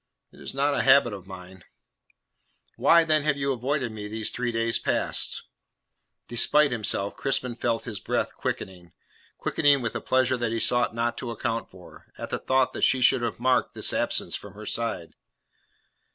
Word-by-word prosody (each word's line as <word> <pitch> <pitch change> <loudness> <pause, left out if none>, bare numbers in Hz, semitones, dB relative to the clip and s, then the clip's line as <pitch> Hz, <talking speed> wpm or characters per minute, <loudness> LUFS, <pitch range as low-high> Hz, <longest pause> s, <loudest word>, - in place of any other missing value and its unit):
"It - - -18
is - - -7
not 140 +1 +1
a - - +1
habit 130 -4 +5
of 95 -2 -9
mine." 95 -1 -11 1.1
"Why, 170 0 +5
then, 155 -2 +2
have 145 -1 0
you 140 0 -1
avoided 130 0 -2
me 105 -1 -7
these 110 +1 -2
three 125 -1 -2
days 115 0 0
past?" - - -1 0.8
Despite 145 +4 +3
himself 105 -3 -1
Crispin 130 -2 -1
felt 115 -1 -1
his 110 -4 -6
breath - - -2
quickening 90 -3 -5 0.4
quickening 145 -1 +2
with 115 -3 -3
a - - -4
pleasure 130 0 +1
that 120 -2 -2
he 115 - -1
sought 120 0 +1
not 120 0 -1
to 120 - -5
account 115 0 -3
for 90 -1 -16
at - - -7
the - - -2
thought 130 0 +1
that - - -6
she 130 - +4
should 125 0 +4
have 120 -2 -3
marked 125 +1 +1
his - - +1
absence - - -1
from 100 -1 -9
her 105 +1 -10
side. 115 -9 -2
120 Hz, 180 wpm, -26 LUFS, 110-130 Hz, 1.1 s, habit